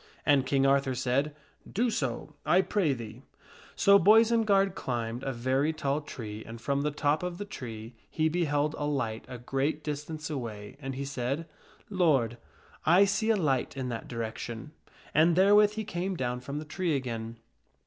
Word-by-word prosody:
And 140 -3 +4
King 135 0 +2
Arthur 135 -1 +3
said, 130 +4 0 0.2
" - - -19
Do 240 0 +3
so, 140 - -3
I 185 +2 +4
pray 190 -4 +1
thee." 115 -1 -8 0.5
So 200 0 +6
Boisenard 215 -1 +5
climbed 120 -6 -3
a 135 - -2
very 130 +5 0
tall 145 -1 -1
tree 110 -7 -7
and 115 +1 -9
from 140 +4 0
the 150 - +1
top 145 +1 0
of 180 -1 -4
the 205 - -5
tree 115 - -8 0.2
he 160 0 +1
Boisenard 160 - -2
be 175 - 0
beheld 145 -1 +1
a 145 - -1
light 125 -7 -2
a 125 -1 -7
great 135 +5 -2
distance 150 +1 -4
away, 110 -7 -5
and 135 -2 -5
he 140 +1 -4
said, 135 +4 -3 0.2
" - - -28
Lord, 135 - +2 0.4
I 175 +5 +6
hoidethaiight. - - +3
see 220 +2 0
a 225 - +5
light 140 -8 0
in 130 -1 -3
that 115 -2 -5
direction." 115 +3 -5 0.4
And 165 +2 +5
therewith 205 +3 +6
he 220 0 -3
came 185 0 -3
down 125 -2 -2
from 140 +3 -6
the 155 - -5
tree 170 +1 -1
again. 115 -3 -4
140 Hz, 190 wpm, -29 LUFS, 125-170 Hz, 0.5 s, So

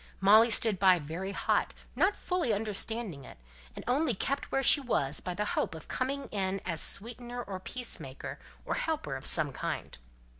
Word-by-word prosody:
Molly 215 +4 +6
stood 220 -3 +2
by, 185 -2 +6
very 170 +5 -5
hot, - - 0 0.2
not 390 +3 +2
fully 355 - -1
understanding 210 - -2
it; 125 - -12 0.4
and - - -8
only 255 0 +1
kept 275 +8 -2
where 270 - +1
she 285 - +8
was 150 - +1
by 180 - -5
the 210 - -1
hope - - -1
of 160 - -11
coming 275 +2 -2
in 195 -1 -1
as 170 -3 0
sweetener 240 +2 -2
or 190 -3 -6
peacemaker, 245 +6 -6 0.3
or - - -1
helper 300 - -2
of 135 - +1
some 150 -4 +4
kind. - - -5
210 Hz, 175 wpm, -30 LUFS, 180-250 Hz, 0.4 s, she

